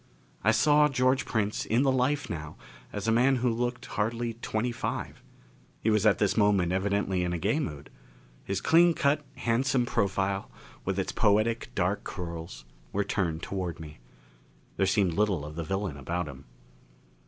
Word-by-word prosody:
I 110 Hz, -, +4 dB
saw 150 Hz, +6 st, +5 dB
George 130 Hz, -1 st, +2 dB
Prince 105 Hz, -2 st, -1 dB
in 115 Hz, +5 st, +2 dB
the 135 Hz, -, +3 dB
life 130 Hz, +3 st, +1 dB
now 75 Hz, -1 st, -6 dB, 0.4 s
as 105 Hz, +1 st, -4 dB
a -, -, +4 dB
man 125 Hz, +4 st, +4 dB
who 125 Hz, 0 st, +1 dB
looked 120 Hz, +2 st, -2 dB
hardly 115 Hz, +2 st, -2 dB
twenty 115 Hz, +3 st, -1 dB
five. 115 Hz, -, -4 dB, 0.6 s
He 110 Hz, -, +1 dB
was 105 Hz, 0 st, +3 dB
at 105 Hz, -, +4 dB
this 105 Hz, -2 st, +1 dB
moment 100 Hz, -5 st, +3 dB
evidently 95 Hz, -1 st, 0 dB
in 90 Hz, 0 st, -1 dB
a -, -, -1 dB
gay 105 Hz, -, +1 dB
mood. 75 Hz, -, -5 dB, 0.5 s
His 100 Hz, -, -2 dB
clean 170 Hz, +1 st, +5 dB
cut, 145 Hz, +2 st, +2 dB
handsome 125 Hz, +2 st, +1 dB
profile, 100 Hz, -3 st, 0 dB, 0.4 s
with -, -, -1 dB
its -, -, -1 dB
poetic 110 Hz, +3 st, +2 dB
dark 95 Hz, +2 st, 0 dB
curls, 85 Hz, -, -7 dB, 0.3 s
was 100 Hz, +1 st, 0 dB
turned 85 Hz, -5 st, -1 dB
toward 90 Hz, -4 st, -4 dB
me. 75 Hz, -4 st, -10 dB, 0.8 s
There 95 Hz, -, +1 dB
seemed 95 Hz, -3 st, +2 dB
little 100 Hz, -6 st, +1 dB
of 75 Hz, +1 st, -8 dB
the 85 Hz, -, -3 dB
villain 95 Hz, -2 st, -3 dB
about 85 Hz, +5 st, -3 dB
him. 70 Hz, -1 st, -10 dB
105 Hz, 165 wpm, -28 LUFS, 90-120 Hz, 0.8 s, saw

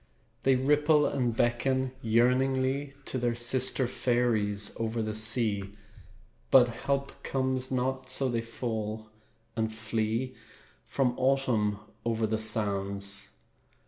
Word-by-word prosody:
They 135 Hz, -1 st, +3 dB
ripple 150 Hz, +3 st, +3 dB
and 120 Hz, -3 st, -1 dB
beckon 130 Hz, +2 st, 0 dB
yearningly 130 Hz, +4 st, +1 dB
To 130 Hz, -, -2 dB
their 120 Hz, -1 st, 0 dB
sister 125 Hz, +2 st, +3 dB
fairies 115 Hz, -5 st, 0 dB
over 115 Hz, +1 st, -3 dB
the 110 Hz, -1 st, -2 dB
sea, 110 Hz, -2 st, +2 dB, 0.8 s
But 125 Hz, -2 st, +6 dB
help 140 Hz, +3 st, -3 dB
comes 130 Hz, -1 st, -1 dB
not, 130 Hz, 0 st, -2 dB
So 135 Hz, +1 st, +2 dB
they 120 Hz, -2 st, -1 dB
fall 110 Hz, -2 st, -5 dB, 0.4 s
and 110 Hz, -1 st, -1 dB
flee 110 Hz, +3 st, -2 dB, 0.5 s
From 130 Hz, -3 st, 0 dB
Autumn 130 Hz, -6 st, +1 dB, 0.3 s
over 115 Hz, -1 st, 0 dB
the 110 Hz, 0 st, -1 dB
sands. 100 Hz, -2 st, +1 dB
120 Hz, 110 wpm, -28 LUFS, 110-130 Hz, 0.8 s, But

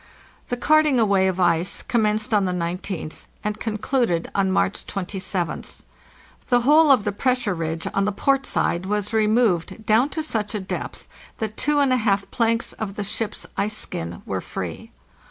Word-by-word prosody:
The 245 Hz, -, -1 dB
carting 305 Hz, 0 st, +4 dB
away 200 Hz, -4 st, +3 dB
of 190 Hz, 0 st, -1 dB
ice 175 Hz, 0 st, +1 dB
commenced 215 Hz, -2 st, 0 dB
on 205 Hz, -2 st, +4 dB
the 180 Hz, -, 0 dB
19th 175 Hz, -1 st, -4 dB, 0.2 s
and 210 Hz, 0 st, -2 dB
con 220 Hz, -1 st, -2 dB
cluded 215 Hz, -8 st, 0 dB
on 195 Hz, -1 st, +1 dB
March 195 Hz, +1 st, 0 dB
27th. 185 Hz, -2 st, -4 dB, 0.7 s
The 245 Hz, -1 st, +4 dB
whole 300 Hz, +5 st, +6 dB
of 260 Hz, -6 st, +5 dB
the 205 Hz, -, 0 dB
pressure 250 Hz, -1 st, 0 dB
ridge 165 Hz, -1 st, -3 dB
on 195 Hz, -, +1 dB
the 205 Hz, -, +1 dB
port 270 Hz, +6 st, +1 dB
side 175 Hz, +2 st, 0 dB
was 210 Hz, +1 st, -1 dB
removed 220 Hz, -2 st, +1 dB
down 230 Hz, +6 st, +4 dB
to 315 Hz, -, -3 dB
such 220 Hz, -7 st, -2 dB
a -, -, -1 dB
depth 190 Hz, -, -6 dB, 0.3 s
that 215 Hz, -1 st, -3 dB
two 295 Hz, +5 st, +1 dB
and 280 Hz, -3 st, +4 dB
a -, -, +3 dB
half 200 Hz, -4 st, 0 dB
planks 230 Hz, -1 st, 0 dB
of 200 Hz, -3 st, -5 dB
the 210 Hz, -, -3 dB
ship's 205 Hz, +2 st, -3 dB
ice 215 Hz, +1 st, +1 dB
skin 85 Hz, -, -4 dB
were -, -, -3 dB
free. -, -, -6 dB
210 Hz, 175 wpm, -23 LUFS, 190-240 Hz, 0.7 s, whole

